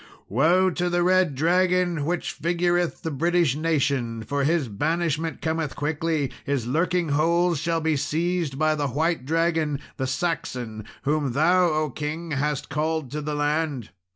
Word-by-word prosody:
"Woe 175 Hz, -, +3 dB
to 180 Hz, +1 st, -1 dB
the 175 Hz, 0 st, +1 dB
red 185 Hz, -4 st, +3 dB
dragon, 175 Hz, 0 st, +2 dB
which 175 Hz, +2 st, -1 dB
figureth 175 Hz, 0 st, 0 dB
the 160 Hz, -, -2 dB
British 170 Hz, 0 st, +2 dB
nation, 140 Hz, -7 st, 0 dB
for 140 Hz, +4 st, -1 dB
his 155 Hz, -1 st, +1 dB
banishment 160 Hz, +8 st, -1 dB
cometh 160 Hz, -2 st, -1 dB
quickly; 150 Hz, -1 st, -1 dB
his 140 Hz, -4 st, -1 dB
lurkingholes 170 Hz, +2 st, +1 dB
shall 165 Hz, +1 st, 0 dB
be 160 Hz, -1 st, +1 dB
seized 165 Hz, 0 st, -1 dB
by 155 Hz, +1 st, +2 dB
the 145 Hz, -2 st, -1 dB
white 155 Hz, +1 st, -1 dB
dragon 160 Hz, -2 st, +1 dB, 0.2 s
the 130 Hz, -, -1 dB
Saxon 125 Hz, -7 st, -3 dB, 0.2 s
whom 145 Hz, -3 st, 0 dB
thou, 175 Hz, +6 st, +4 dB
O 155 Hz, -2 st, 0 dB
king, 155 Hz, +4 st, -4 dB
hast 145 Hz, 0 st, -1 dB
called 155 Hz, -2 st, -2 dB
to 150 Hz, +1 st, -3 dB
the 150 Hz, 0 st, -3 dB
land. 145 Hz, -5 st, -1 dB
155 Hz, 150 wpm, -25 LUFS, 145-170 Hz, 0.2 s, thou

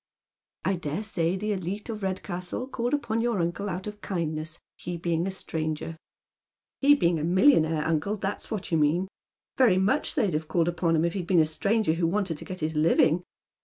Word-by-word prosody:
" -, -, -23 dB
I 190 Hz, -1 st, +1 dB
dare 165 Hz, +4 st, -3 dB
say 180 Hz, -5 st, 0 dB
the 210 Hz, +3 st, -2 dB
elite 195 Hz, +1 st, -3 dB
of 220 Hz, -2 st, -5 dB
Redcastle 185 Hz, +3 st, -3 dB
called 245 Hz, +1 st, -1 dB
upon 230 Hz, -6 st, -1 dB
yom* 235 Hz, -4 st, 0 dB
uncle 175 Hz, +4 st, -1 dB
out 185 Hz, +1 st, -4 dB
of 210 Hz, 0 st, -7 dB
kindness, 160 Hz, -3 st, -3 dB, 0.2 s
he 175 Hz, 0 st, -5 dB
being 170 Hz, +1 st, 0 dB
a -, -, 0 dB
Btranger," 160 Hz, -3 st, -4 dB, 0.4 s
" -, -, -66 dB
He 285 Hz, +1 st, +7 dB
being 170 Hz, -, +2 dB
a -, -, -3 dB
millionaire, 165 Hz, -, +4 dB
uncle, 165 Hz, +6 st, 0 dB
that's 200 Hz, -1 st, -4 dB
what 215 Hz, -6 st, -4 dB
you 165 Hz, -, +3 dB
mean. 160 Hz, +5 st, +2 dB, 0.5 s
Very 230 Hz, -8 st, +5 dB
much 210 Hz, +10 st, +1 dB
they'd 200 Hz, -5 st, +1 dB
have 155 Hz, +1 st, -2 dB
called 170 Hz, 0 st, +1 dB
upon 170 Hz, -1 st, +1 dB
him 160 Hz, +1 st, +2 dB
if 170 Hz, -, 0 dB
he'd 180 Hz, -4 st, -4 dB
been 180 Hz, -2 st, +4 dB
a 155 Hz, -, +5 dB
stranger 200 Hz, +3 st, +1 dB
who 165 Hz, 0 st, +1 dB
wanted 180 Hz, -3 st, -1 dB
to -, -, -9 dB
get 185 Hz, -2 st, -7 dB
his 155 Hz, +1 st, -1 dB
living. 160 Hz, +2 st, +4 dB
180 Hz, 205 wpm, -27 LUFS, 165-205 Hz, 0.5 s, He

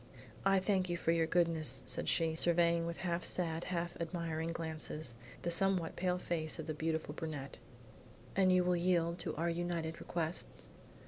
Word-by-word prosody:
"I 195 Hz, 0 st, +5 dB
thank 185 Hz, -1 st, +2 dB
you 175 Hz, -, 0 dB
for 165 Hz, -, +2 dB
your 165 Hz, -1 st, +3 dB
goodness," 165 Hz, -2 st, +1 dB
said -, -, 0 dB
she, 165 Hz, -1 st, +2 dB
surveying 170 Hz, 0 st, +3 dB
with 170 Hz, -, -3 dB
half 175 Hz, 0 st, 0 dB
sad, 165 Hz, -2 st, -1 dB
half 170 Hz, -1 st, -2 dB
admiring 165 Hz, -1 st, -2 dB
glances, 155 Hz, -5 st, -5 dB, 0.3 s
the 175 Hz, -, 0 dB
somewhat 185 Hz, -2 st, +1 dB
pale 180 Hz, 0 st, +1 dB
face 165 Hz, -3 st, -2 dB
of 160 Hz, -, -5 dB
the 155 Hz, -, -2 dB
beautiful 160 Hz, -1 st, -1 dB
brunette. 150 Hz, -4 st, -5 dB, 0.8 s
"And 190 Hz, -1 st, +5 dB
you 185 Hz, 0 st, +5 dB
will 180 Hz, 0 st, +3 dB
yield 170 Hz, -1 st, +2 dB
to 160 Hz, -2 st, -3 dB
our 170 Hz, +2 st, +1 dB
united 170 Hz, -1 st, -2 dB
requests?" 170 Hz, 0 st, -3 dB
170 Hz, 170 wpm, -35 LUFS, 160-175 Hz, 0.8 s, I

